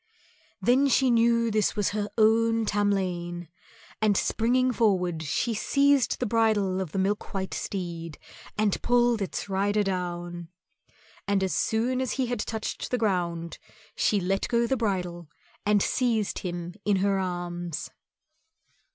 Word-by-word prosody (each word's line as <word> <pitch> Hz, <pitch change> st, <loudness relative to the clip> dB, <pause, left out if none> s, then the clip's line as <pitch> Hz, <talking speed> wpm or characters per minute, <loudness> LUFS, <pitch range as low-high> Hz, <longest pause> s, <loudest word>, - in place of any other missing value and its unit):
Then 260 Hz, +4 st, +3 dB
she 265 Hz, -1 st, +3 dB
knew 230 Hz, 0 st, +3 dB
this 215 Hz, -1 st, +1 dB
was 205 Hz, -2 st, +1 dB
her 210 Hz, 0 st, -2 dB
own 225 Hz, +1 st, +3 dB
Tamlane, 180 Hz, -5 st, -1 dB, 0.5 s
and 210 Hz, -2 st, +3 dB
springing 255 Hz, +3 st, +2 dB
forward 180 Hz, -8 st, +1 dB
she 160 Hz, -, -1 dB
seized 280 Hz, +4 st, +2 dB
the 250 Hz, -, 0 dB
bridle 210 Hz, -4 st, +1 dB
of 180 Hz, -5 st, -5 dB
the -, -, -4 dB
milk 200 Hz, +2 st, -1 dB
white 190 Hz, -1 st, -3 dB
steed 170 Hz, -4 st, -5 dB, 0.4 s
and 210 Hz, -2 st, +1 dB
pulled 240 Hz, -2 st, +2 dB
its 195 Hz, -, -3 dB
rider 205 Hz, +2 st, +1 dB
down. 175 Hz, -2 st, -4 dB, 0.8 s
And 200 Hz, -1 st, +2 dB
as 190 Hz, -, 0 dB
soon 245 Hz, +4 st, 0 dB
as 260 Hz, -, -1 dB
he 265 Hz, -, 0 dB
had 245 Hz, -1 st, -3 dB
touched 220 Hz, 0 st, -4 dB
the 250 Hz, -, 0 dB
ground 175 Hz, -6 st, -1 dB, 0.4 s
she 210 Hz, -, +2 dB
let 195 Hz, +2 st, -1 dB
go 235 Hz, 0 st, +2 dB
the 265 Hz, -, +1 dB
bridle 180 Hz, -, -2 dB, 0.4 s
and 210 Hz, -1 st, +4 dB
seized 230 Hz, -5 st, 0 dB
him 175 Hz, -1 st, -5 dB
in 205 Hz, -1 st, +2 dB
her 195 Hz, 0 st, +1 dB
arms. 175 Hz, -2 st, -4 dB
205 Hz, 140 wpm, -27 LUFS, 180-230 Hz, 0.8 s, and